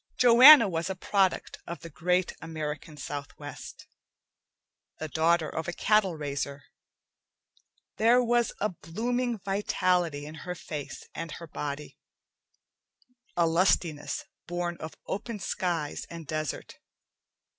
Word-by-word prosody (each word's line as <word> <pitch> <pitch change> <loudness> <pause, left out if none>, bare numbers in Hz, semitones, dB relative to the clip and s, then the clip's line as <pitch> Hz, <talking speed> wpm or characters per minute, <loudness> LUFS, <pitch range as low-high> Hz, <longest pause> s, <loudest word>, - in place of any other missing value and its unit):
Joanna 250 +1 +9
was 170 0 -2
a 190 - -2
product 190 0 0
of 170 -3 -6
the 165 - -8
great 180 +4 +1
American 155 -1 -5
southwest, 145 -1 -8 1.1
the 155 - -4
daughter 160 +1 +2
of 160 +1 -4
a 175 - -2
cattle 210 -4 +2
raiser. 140 -2 -4 1.3
There 240 +3 +5
was 240 -1 +2
a 210 - +1
blooming 235 +8 -2
vitality 180 -6 0
in 155 - -8
her 180 -1 -5
face 150 -4 -7
and 165 -1 -5
her 170 - -8
body, 150 -1 -6 1.4
a 170 - +4
lustiness 165 -2 +1 0.2
born 175 0 -2
of 155 - -8
open 215 +3 -4
skies 175 -6 -2
and 165 -1 -8
desert. 155 0 -4
170 Hz, 115 wpm, -28 LUFS, 155-195 Hz, 1.4 s, Joanna